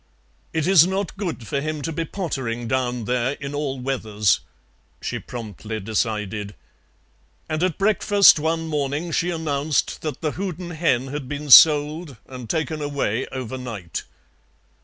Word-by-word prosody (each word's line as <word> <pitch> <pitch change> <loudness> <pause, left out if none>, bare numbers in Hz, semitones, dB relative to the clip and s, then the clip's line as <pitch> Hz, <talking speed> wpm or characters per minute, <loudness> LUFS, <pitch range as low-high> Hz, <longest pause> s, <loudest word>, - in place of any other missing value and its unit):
"It 160 -2 -1
is 180 -3 +6
not 190 0 -2
good 175 - -4
for 140 +6 -2
him 155 -1 -3
to 165 - -2
be 165 +1 -2
pottering 130 -10 -3
down 125 -2 -1
there 125 +2 0
in 140 0 -7
all 145 -2 -2
weathers," 110 -6 +1 0.6
she - - -4
promptly 110 -2 -7
decided, 105 -1 -2 0.9
and 155 0 -2
at 185 -2 0
breakfast 205 -3 +5
one 165 +1 -1
morning 150 +2 -2
she 170 +2 0
announced 155 -3 -1
that 155 -2 -5
the 155 -2 0
Houdan 180 -1 -5
hen 155 -7 +1
had 140 -2 -5
been 145 -1 -4
sold 150 +1 +7
and 125 -3 -9
taken 155 +1 -1
away 140 -5 -1
overnight. 125 -7 -5
145 Hz, 140 wpm, -23 LUFS, 125-160 Hz, 0.9 s, sold